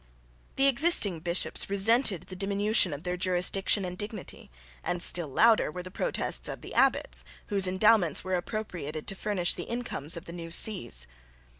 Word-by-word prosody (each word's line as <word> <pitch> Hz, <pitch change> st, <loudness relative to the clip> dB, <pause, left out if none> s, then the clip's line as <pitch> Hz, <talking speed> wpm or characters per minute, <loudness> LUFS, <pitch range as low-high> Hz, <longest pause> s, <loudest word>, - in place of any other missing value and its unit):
The 270 Hz, -, +2 dB
existing 265 Hz, -, +4 dB
bishops 170 Hz, +4 st, +1 dB
resented 200 Hz, -, +2 dB
the 185 Hz, -, -10 dB
diminution 200 Hz, 0 st, +1 dB
of 145 Hz, +2 st, -7 dB
their 180 Hz, 0 st, -3 dB
jurisdiction 185 Hz, +2 st, +1 dB
and 180 Hz, 0 st, -6 dB
dignity, 210 Hz, 0 st, -7 dB, 0.3 s
and 175 Hz, -, -2 dB
still 175 Hz, -1 st, +2 dB
louder 220 Hz, -, +3 dB
were 180 Hz, +2 st, -7 dB
the 185 Hz, -, -10 dB
protests -, -, -2 dB
of -, -, -7 dB
the -, -, -10 dB
abbots, -, -, +1 dB, 0.3 s
whose 200 Hz, -3 st, +1 dB
endowments 190 Hz, -2 st, +2 dB
were 185 Hz, +1 st, -4 dB
appropriated 175 Hz, -6 st, -5 dB
to -, -, -3 dB
furnish 190 Hz, -3 st, 0 dB
the 175 Hz, -, -6 dB
incomes 235 Hz, -, -2 dB
of 170 Hz, -, -9 dB
the 170 Hz, -, -10 dB
new 170 Hz, -1 st, -8 dB
sees. 165 Hz, -, +1 dB
185 Hz, 165 wpm, -28 LUFS, 175-215 Hz, 0.3 s, existing